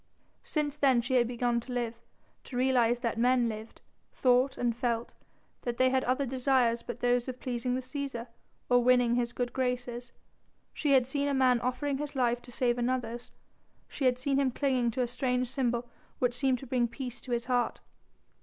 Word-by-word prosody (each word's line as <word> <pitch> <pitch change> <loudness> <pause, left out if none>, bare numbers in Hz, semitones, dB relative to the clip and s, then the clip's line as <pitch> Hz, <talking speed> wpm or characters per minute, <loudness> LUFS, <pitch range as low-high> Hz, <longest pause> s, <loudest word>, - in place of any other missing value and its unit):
Since 300 -2 -2
then 265 -4 +4
she 245 - -2
had 245 -2 +4
begun 240 0 0
to 245 +2 -9
live, 240 -2 -1 0.5
to 245 - -6
realise 245 -2 +3
that 230 -2 -1
men 245 0 +3
lived, 220 0 -7 0.3
thought 255 +1 +2
and 240 -2 0
felt, 235 -1 -2 0.5
that 240 -1 -3
they 255 0 +4
had 260 0 +2
other 260 +3 +1
desires 255 -2 +2
but 240 0 -7
those 245 0 +2
of 255 -1 -5
pleasing 250 0 -2
the 260 - -2
Cæsar 260 -3 -4 0.4
or 245 -1 +4
winning 245 -1 +4
his 240 -1 0
good 245 0 -3
graces. 245 -1 -2 0.6
She 290 -3 +1
had 260 -2 +5
seen 280 +2 -1
a 280 - +1
man 255 -2 +4
offering 270 +2 -1
his 295 -1 -5
life 245 -2 +1
to 245 - -13
save 245 0 0
another's, 240 -1 -2 0.6
she 275 - -3
had 250 -1 +3
seen 270 +2 0
him 275 -2 +2
clinging 255 -2 +1
to 250 +2 -1
a - - -1
strange 250 0 -1
symbol 245 -2 -1 0.3
which 245 -1 +1
seemed 260 +1 +1
to 270 - -10
bring 245 -1 +1
peace 245 0 -6
to 255 - -8
his 235 0 0
heart. 245 -1 0
250 Hz, 190 wpm, -30 LUFS, 240-260 Hz, 0.6 s, had